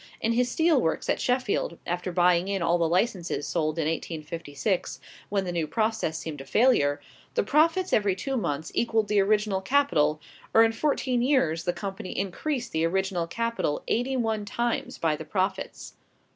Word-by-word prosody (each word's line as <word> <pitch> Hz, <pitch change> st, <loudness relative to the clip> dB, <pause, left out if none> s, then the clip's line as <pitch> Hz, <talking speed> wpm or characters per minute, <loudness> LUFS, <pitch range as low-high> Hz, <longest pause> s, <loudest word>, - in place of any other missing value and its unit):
In 230 Hz, -, 0 dB
his 245 Hz, +1 st, +2 dB
steel 320 Hz, 0 st, +3 dB
works 160 Hz, -, -1 dB
at -, -, -1 dB
Sheffield, 250 Hz, -9 st, 0 dB
after 180 Hz, +1 st, -2 dB
buying 175 Hz, 0 st, +3 dB
in 195 Hz, -3 st, -1 dB
all 170 Hz, +1 st, +2 dB
the 165 Hz, -1 st, +2 dB
licenses 180 Hz, -4 st, 0 dB
sold 155 Hz, -2 st, -1 dB
in 160 Hz, -, 0 dB
1856, 165 Hz, +2 st, -3 dB, 0.3 s
when 195 Hz, -1 st, 0 dB
the 180 Hz, -, -2 dB
new 170 Hz, -3 st, -1 dB
process 220 Hz, -5 st, -1 dB
seemed 155 Hz, -3 st, -6 dB
a -, -, -10 dB
failure, 145 Hz, -, +3 dB, 0.4 s
the -, -, +2 dB
profits 325 Hz, -, +2 dB
every 200 Hz, -3 st, +3 dB
two 270 Hz, +8 st, -3 dB
months 160 Hz, -, -2 dB
equalled 225 Hz, -3 st, +1 dB
the 210 Hz, -1 st, +3 dB
original 205 Hz, -1 st, +2 dB
capital, 190 Hz, -, +2 dB, 0.4 s
or 225 Hz, -, +8 dB
in 225 Hz, -, +3 dB
fourteen 255 Hz, 0 st, 0 dB
years 245 Hz, -, +2 dB
the 175 Hz, -, +2 dB
company 190 Hz, +1 st, -6 dB
increased 240 Hz, -, -2 dB
the 160 Hz, 0 st, 0 dB
original 185 Hz, 0 st, 0 dB
capital 230 Hz, -6 st, -2 dB
eighty 255 Hz, +3 st, 0 dB
one 220 Hz, -3 st, 0 dB
times 235 Hz, +3 st, -2 dB
by 160 Hz, -2 st, +1 dB
the 160 Hz, -, -7 dB
profits. 190 Hz, +4 st, -3 dB
195 Hz, 170 wpm, -27 LUFS, 165-230 Hz, 0.4 s, or